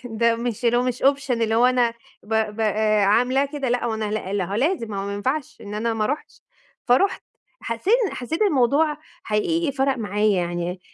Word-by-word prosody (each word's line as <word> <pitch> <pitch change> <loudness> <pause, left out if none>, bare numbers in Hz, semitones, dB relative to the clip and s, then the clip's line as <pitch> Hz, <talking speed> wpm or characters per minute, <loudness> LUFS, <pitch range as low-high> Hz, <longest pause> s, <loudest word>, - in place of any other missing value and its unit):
ده 230 0 +1
مش 235 0 -4
اللي 235 0 +3
هو 245 - +3
مش 250 -1 -3
option 275 0 +2
اللي 230 -2 +1
هو 235 +2 +5
أنا 250 -2 +3 0.3
ب 220 +2 -4 0.2
ب - - -5
آآ 215 -1 +2
عاملاه 250 +7 +3
كده 280 -3 -2
لأ، 245 0 0
هو 225 - -1
أنا 220 0 -3
لأ، 210 -3 -3
لأ، 200 -2 0
هو 195 - -5
لازم 265 - 0
ما 200 - -4
هو - - -5
ما 200 - -3
ينفعش 260 +8 -3
إن 205 0 -8
أنا 225 +2 -1
ما 215 -1 0
اروحش؛ 290 +5 -5 0.4
فرُحت. 255 +12 +2 0.4
حسّيت 230 - 0
إن - - -5
حسّيت 310 - -3
الموضوع 295 - +2 0.3
حقيقي 290 +9 0
فَرَق 270 0 +1
معايا 210 -1 +1
يعني، 175 +1 -3
235 Hz, 210 wpm, -23 LUFS, 215-270 Hz, 0.4 s, هو